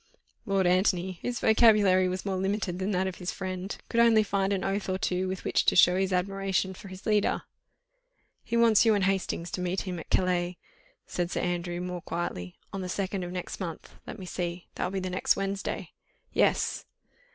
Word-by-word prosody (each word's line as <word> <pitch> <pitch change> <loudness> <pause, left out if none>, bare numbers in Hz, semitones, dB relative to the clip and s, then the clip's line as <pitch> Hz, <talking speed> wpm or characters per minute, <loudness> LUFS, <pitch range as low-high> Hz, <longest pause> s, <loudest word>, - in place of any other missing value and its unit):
Lord 195 -1 +2
Antony, 185 0 +2
whose 245 -1 -2
vocabulary 210 -5 +5
was 185 +2 -4
more 195 -2 -1
limited 190 -1 -1
than 190 +1 -1
that 190 -2 +1
of 190 -1 -4
his 180 -1 -3
friend, 185 0 -5
could 230 - 0
only 230 -2 +6
find 200 -1 0
an 195 -1 0
oath 195 0 -1
or 185 - 0
two 185 0 -1
with 185 0 -4
which - - +2
to - - +4
show 180 0 +7
his 190 0 0
admiration 190 +1 0
for 190 - -11
his 185 +1 -10
leader. 210 -2 +2 1.0
"He 235 - -1
wants 230 -3 +6
you 225 -2 +4
and 200 - +1
Hastings 185 -3 -1
to 180 - -3
meet 180 +1 -1
him 180 -3 -4
at - - -10
Calais," 180 -1 +1 0.5
said 175 -1 -2
Sir - - -2
Andrew, 175 0 -2
more 180 -1 -4
quietly, 90 - -4 0.2
"on 195 - -3
the 185 - -4
2nd 190 0 -2
of 175 - -5
next 180 -1 -5
month. 170 -4 -6
Let - - -6
me 190 - -8
see! 175 -1 -4
that - - -2
will 195 - -2
be 185 - -3
next 185 0 +2
Wednesday." 195 0 -3 0.4
"Yes." - - +1
185 Hz, 200 wpm, -28 LUFS, 180-195 Hz, 1.0 s, show